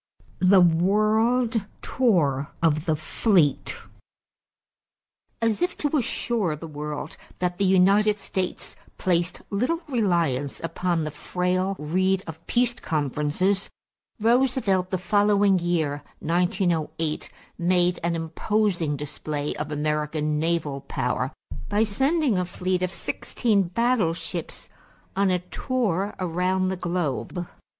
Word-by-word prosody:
=The 185 0 +6
World 215 +6 +3 0.2
Tour 150 - +2 0.2
of 155 -1 +2
the 160 - +3
Fleet.= 160 0 +1 1.6
As 230 +2 +1
if 355 0 0
to 295 +1 0
assure 230 - 0
the 155 - -9
world 150 -1 -5
then - - -21
that 180 -1 -1
the 200 - +3
United 200 +3 +4
States 190 -2 -4 0.2
placed 175 -1 0
little 250 +12 0
reliance 170 - 0
upon 170 0 -1
the 155 - -3
frail 180 +5 -1
reed 185 +5 +1
of 160 0 -9
peace 240 0 +2
conferences, 155 - -1 0.5
Roosevelt 230 -5 +2
the 185 - 0
following 205 +1 +3
year 160 -4 0 0.2
(1908) 165 -2 0 0.3
made 175 0 +2
an 170 0 +1
imposing 165 -1 0
display 150 +1 -4
of 150 0 -4
American 150 0 -1
naval 155 -4 -1
power 125 +2 -1 0.4
by 205 +2 +3
sending 265 - +1
a 180 - 0
fleet 180 +1 -2
of 185 0 0
sixteen 200 -1 0
battleships 210 -4 -1 0.5
on 195 0 +3
a 180 - +3
tour 200 +1 -2
around 185 +1 0
the 190 - -1
globe. 175 0 -2
180 Hz, 115 wpm, -25 LUFS, 160-205 Hz, 1.6 s, =The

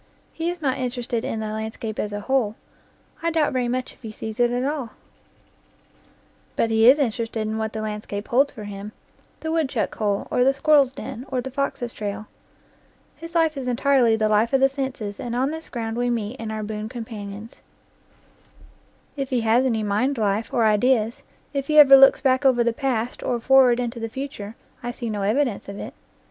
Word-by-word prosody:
He 330 +1 -2
is 350 -2 -6
not 265 -2 0
interested 245 -2 -2
in 220 - -3
the 215 0 -4
landscape 220 0 -5
as 210 - -2
a 205 0 -4
whole: 225 -2 0 0.7
I 335 - +1
doubt 320 -4 +1
very 250 -1 0
much 255 +1 -3
if - - -26
he 225 -3 -7
sees 220 +1 -7
it 240 0 +4
at 245 +1 -1
all; 280 -5 -3 1.6
but 225 - +1
he 225 +2 +6
is 270 - +7
interested 230 -4 -1
hi 215 - -2
what 220 0 -2
the 220 -1 -4
landscape 210 -1 -5
holds 275 +4 +3
for 215 - -9
him 205 +1 -7 0.5
the 320 - -3
woodchuck 320 -4 0
hole, 205 -3 -1
or 250 - +3
the 270 +1 +3
squir 310 +3 +2
rel's 275 -3 +4
den, 260 0 -8
or 260 - 0
the 265 +2 -5
fox's 255 -3 -3
trail. 210 0 -5 0.9
His 330 +1 -10
life 325 -2 +3
is 265 -2 -5
entirely 250 -2 +3
the 220 -1 +1
life 215 +4 +2
of 270 - +5
the 270 0 +5
senses, 265 -7 -4
and 240 -1 -4
on 265 +3 +1
this 320 0 -7
ground 225 -2 -4
we 245 0 0
meet 230 0 -2
and 225 -1 -5
are 215 0 -4
boon 215 0 -5
companions. 220 -3 -8 1.6
If 275 -2 -3
he 250 -3 +1
has 225 +3 +3
any 225 -4 0
mind 220 +7 0
life, 210 0 0
and 235 - +2
ideas, 225 +1 +2 0.3
if 275 -1 -2
he 305 - +2
ever 275 -2 +10
looks 270 0 +7
back 260 0 +2
over 255 -3 +4
the 235 0 +1
past, 245 -3 -2
or 240 - -1
forward 255 0 +5
into 240 -1 -3
the 225 0 -4
future, 225 -4 -6 0.3
I 240 - -4
see 240 -2 -4
no 205 -1 -3
evidence 215 +1 0
of 200 - -7
it. - - -7
240 Hz, 205 wpm, -23 LUFS, 220-270 Hz, 1.6 s, ever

